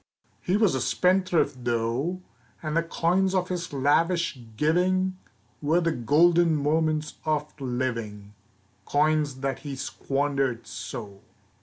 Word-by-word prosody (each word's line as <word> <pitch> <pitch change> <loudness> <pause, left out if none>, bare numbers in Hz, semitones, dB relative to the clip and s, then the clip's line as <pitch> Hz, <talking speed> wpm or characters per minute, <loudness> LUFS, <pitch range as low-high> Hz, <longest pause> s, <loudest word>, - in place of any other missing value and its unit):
He 185 +3 +1
was 210 -4 +3
a 130 - -1
spendthrift 180 -5 +1
though, 120 +10 -1 0.4
And 155 0 -2
the 165 - +4
coins 180 +3 +1
of 180 -1 0
his 180 -1 -3
lavish 155 +3 +1 0.2
giving 185 +5 +1 0.4
Were 155 +4 +2
the 165 -1 +1
golden 165 +7 +4
moments 155 +1 0
of 150 -1 -1
living, 115 -5 -3 0.5
Coins 150 -2 +1
that 135 -2 -2
he 145 -3 -6
squandered 135 -2 -1
so. 100 -4 -7
155 Hz, 120 wpm, -26 LUFS, 130-175 Hz, 0.5 s, the